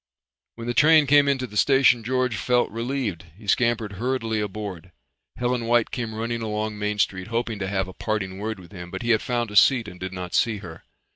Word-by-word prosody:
When 115 - -8
the 120 - -1
train 155 +4 +6
came 145 +1 +5
into 135 -2 +1
the 105 - -12
station 130 0 +4
George 125 0 0
felt 125 +4 +1
relieved. 115 -6 -3
He 105 - -14
scampered 115 0 +1
hurriedly 120 -3 -1
aboard. 100 -4 -5 0.4
Helen 125 -1 -1
White 120 -1 +2
came 115 -3 -4
running 115 +1 -3
along 105 -1 -3
Main 105 0 -1
Street 95 -2 0
hoping 115 -1 -2
to 95 - -2
have 95 -1 -1
a 95 - -9
parting 95 -3 -3
word 110 0 -4
with 90 0 -14
him, 90 -3 -9
but 95 +4 -6
he 120 - +1
had 110 - +3
found 120 -3 -2
a - - -8
seat 120 +1 +5
and 90 +1 -10
did 95 0 -5
not 90 -1 -6
see 115 -3 +2
her. 85 -4 -10
110 Hz, 215 wpm, -24 LUFS, 100-120 Hz, 0.4 s, train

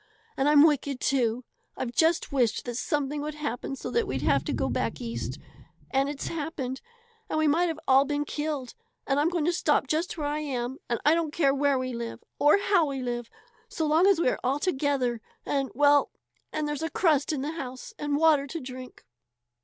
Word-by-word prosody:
"And 270 +2 +2
I'm 295 0 +7
wicked, 285 -3 +1
too! 250 -3 +1 0.3
I've 250 -2 -3
just 320 +5 +2
wished 250 -5 +1
that 245 - -4
something 290 +4 -1
would 300 0 -4
happen 275 -3 -4
so - - -6
we'd - - -3
have - - +3
to - - -2
go - - -1
back - - -2
East, 235 -2 -4 0.5
and 270 +1 +2
it's 285 -1 -5
happened; 290 -5 -4 0.5
and - - -1
we 310 0 +3
might 335 +5 +3
have 325 -2 -3
all 270 +1 +6
been 290 +1 -1
killed. 295 -4 -3 0.3
And 275 0 +1
I'm 300 +3 +3
going 340 -4 -1
to 345 - +2
stop 300 -5 +2
just 320 +6 -1
where 300 - -3
I 295 +1 -1
am. 260 -3 -3 0.3
I 300 - +6
don't 330 -1 0
care 280 -4 +2
where 280 0 +2
we 255 0 -3
live 235 -1 -6 0.2
or 295 +6 +6
how 390 -5 +2
we 270 -2 -3
live 240 -1 -3 0.4
so 320 - -2
long 315 +5 +4
as 395 -4 +4
we 335 - +3
are - - -2
all 260 +3 +1
together 275 -7 0 0.2
and 275 -2 0
well 290 +1 +4 0.4
and 305 -1 -2
there's 295 0 -3
a 325 - -1
crust 310 -6 +2
in 290 -4 -2
the 295 - -2
house 260 -6 -7
and 290 -1 0
water 300 -3 +4
to 330 +4 -5
drink." 255 -1 -9
290 Hz, 205 wpm, -27 LUFS, 260-310 Hz, 0.5 s, I'm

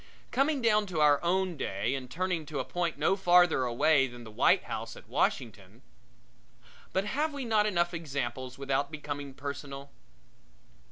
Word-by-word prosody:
Coming 275 0 +1
down 215 -2 +3
to 175 -4 -3
our 150 -1 +5
own 185 +1 +1
day 100 +1 -2
and 130 -2 -5
turning 180 -2 -2
to 150 -2 -5
a - - -2
point 175 -3 -2
no 155 +6 +2
farther 175 -7 +4
away 135 +3 +3
than 120 -1 -11
the 110 - -11
White 105 - +3
House - - -5
at - - -14
Washington - - -2 1.1
but 190 +1 0
have 295 +7 -1
we 275 -3 -4
not 215 -2 +3
enough 175 -3 +1
examples 130 -5 -4
without 140 +1 -1
becoming 145 -3 -6
personal? 140 0 -7
155 Hz, 160 wpm, -30 LUFS, 135-185 Hz, 1.1 s, our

